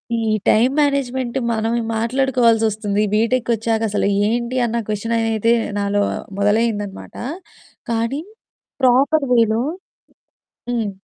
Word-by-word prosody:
ఈ - - 0 0.3
time 245 +5 +4
management 260 -3 -1 0.2
మనం 225 +1 -1 0.2
మాట్లాడుకోవాల్సొస్తుంది. 225 -4 +1
బీటెక్‌కొచ్చాక 225 -1 +1
అసలు 205 - 0 0.2
ఏంటి 240 +2 -1
అన్న 235 0 -1
క్వెషన్ 220 +2 -1
అయితే 225 0 +1 0.3
నాలో 205 0 +1 0.4
మొదలయిందన్నమాట. 205 -1 -1 0.8
కానీ 230 +6 -1 0.6
ప్రాపర్ 275 +4 +4
వేలో 225 -1 +3 1.1
హ్మ్, 230 -4 -1
230 Hz, 90 wpm, -19 LUFS, 220-245 Hz, 1.1 s, time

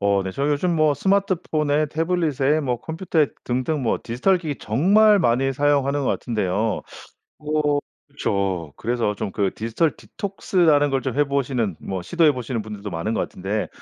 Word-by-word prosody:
어 100 -1 +2
네 95 - -4
저 140 +1 -1
요즘 160 +4 +1
뭐 155 -1 +4
스마트폰에 160 -6 +1
태블릿에 155 -2 +1
뭐 125 -5 -2
컴퓨터에 160 -2 0 0.2
등등 130 +4 -1
뭐 115 - +1
디지털 130 +12 +1
기기 155 -5 -5
정말 200 - +4
많이 135 -3 +2
사용하는 145 0 +1
것 - - -1
같은데요. 105 -1 -1 0.6
어 150 -1 +1 0.3
그쵸. 95 - -2
그래서 115 -2 -1
좀 100 - -4
그 100 0 0
디지털 115 +9 0
디톡스 195 -1 -6
라는 150 -4 +5
걸 135 -1 +1
좀 125 - -3
해 145 - +5
보시는 130 - -1
뭐 95 -1 -4
시도해 160 - +3
보시는 125 -2 -3
분들도 105 -1 -7
많은 85 +5 -3
것 - - 0
같은데 100 +3 -3
140 Hz, 345 characters per minute, -22 LUFS, 110-155 Hz, 0.6 s, 라는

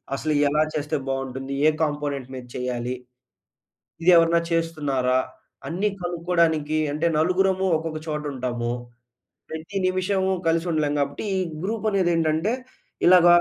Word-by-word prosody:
అసలు 155 +2 -1
ఎలా 150 +2 +2
చేస్తే 150 +1 -2
బావుంటుంది? 135 0 -3
ఏ - - +8
కాంపోనెంట్ 145 -3 -2
మీద 125 -1 -7
చెయ్యాలి. 125 -1 -2 1.1
ఇది 180 - +6
ఎవరైనా 170 0 +5
చేస్తున్నారా? 145 -6 +1 0.5
అన్ని 185 +5 0
కనుక్కోడానికి 170 -3 +1
అంటే 155 +3 0
నలుగురము 190 +3 +2
ఒక్కొక్క 155 0 -4
చోట 150 -1 -2
ఉంటాము. 120 -2 -2 0.8
ప్రతి 160 +5 -6
నిమిషము 190 +1 +1 0.2
కలిసి 165 +1 +2
ఉండలేం 150 -2 +1
గాబట్టి 140 +7 -2
ఈ - - +1 0.3
గ్రూప్ 220 +2 -2
అనేది 190 -4 +2
ఏంటంటే 160 +5 +1 0.5
ఇలాగ 180 -1 +7
155 Hz, 125 wpm, -24 LUFS, 140-175 Hz, 1.1 s, ఏ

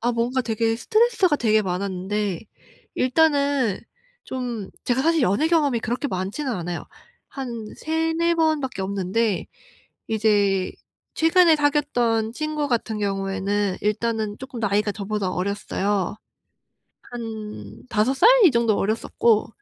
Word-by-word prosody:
아 240 +1 +1
뭔가 240 +3 0
되게 225 -1 0
스트레스가 435 - +2
되게 215 -4 +2
많았는데 190 +1 -2 0.5
일단은 280 - +2 0.4
좀 240 -6 -4 0.2
제가 250 +1 +1
사실 325 0 +2
연애 240 - +2
경험이 290 -8 +2
그렇게 240 +6 -2
많지는 200 +9 -3
않아요. 175 -4 -4 0.4
한 240 -5 -6
3-4 325 +1 0
번밖에 310 -9 0
없는데 195 +1 -1 0.6
이제 205 -3 +2 0.4
최근에 325 0 +5
사귀었던 245 -7 +1
친구 305 +2 -2
같은 225 -3 -1
경우에는 195 0 -1
일단은 215 0 -1
쪼끔 260 -2 -8
나이가 210 0 +1
저보다 200 -1 -3
어렸어요. 200 0 -1 1.0
한 210 - -7
5 215 +5 +2
살? 410 - +5 0.2
이 320 - +7
정도 235 -3 +2
어렸었고 220 +1 +1
225 Hz, 265 characters per minute, -23 LUFS, 200-280 Hz, 1.0 s, 이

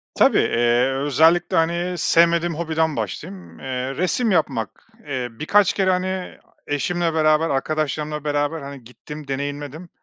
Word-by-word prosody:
Tabii, - - +4
eee, 120 +2 +2
özellikle, 160 +5 +3
hani, 170 +2 0
sevmediğim 170 0 +3
hobiden 160 -1 -1
başlayayım. 95 -5 -6
Eee, 130 0 -4
resim 205 - 0
yapmak, 150 - -1 0.2
eee, 130 -3 -2
birkaç 185 - +2
kere, 190 -1 +1
hani, 185 0 -2 0.3
eşimle 165 +3 -1
beraber 155 0 +3
arkadaşlarımla 150 +1 -2
beraber, 145 +2 -1
hani, 140 -2 -9
gittim. 145 +5 -11
Deneyimledim. 145 +4 -5
155 Hz, 125 wpm, -22 LUFS, 135-170 Hz, 0.3 s, Tabii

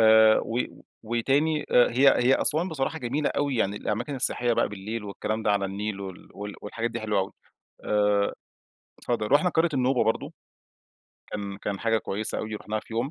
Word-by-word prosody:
آآ، 110 0 +7
و 115 +2 -2 0.4
وتاني 135 +7 +1
آآ، 120 - +5
هي 135 +4 +5 0.2
هي 130 - +6
أسوان 160 +4 +2
بصراحة 160 0 -2
جميلة 140 +4 -1
أوي، 140 -3 0
يعني 100 -2 0
الأماكن 120 +8 -2
السياحية 120 -1 +1
بقى - - +2
بالليل 105 +2 -5
والكلام 110 +2 -3
ده 105 - +2
على 100 -1 +1
النيل 100 +1 -3
وال 95 -2 -8 0.3
والحاجات 115 +3 -3
دي 115 - -4
حلوة 105 -2 0
أوي. 95 - -4 0.5
آآ، 105 -1 +2 0.7
اتفضل. 110 -3 -2
رُحنا 150 +6 +5
قرية 165 +1 +3
النوبة 130 -2 +2
برضو. 110 - -1 1.0
كان 100 -1 -4
كان 100 0 -4
حاجة 115 -1 +2
كويّسة 105 +1 -3
أوي. 110 0 -4
رُحناها 105 0 -3
في 110 - -11
يوم. 125 +5 -1
110 Hz, 175 wpm, -26 LUFS, 105-130 Hz, 1.0 s, آآ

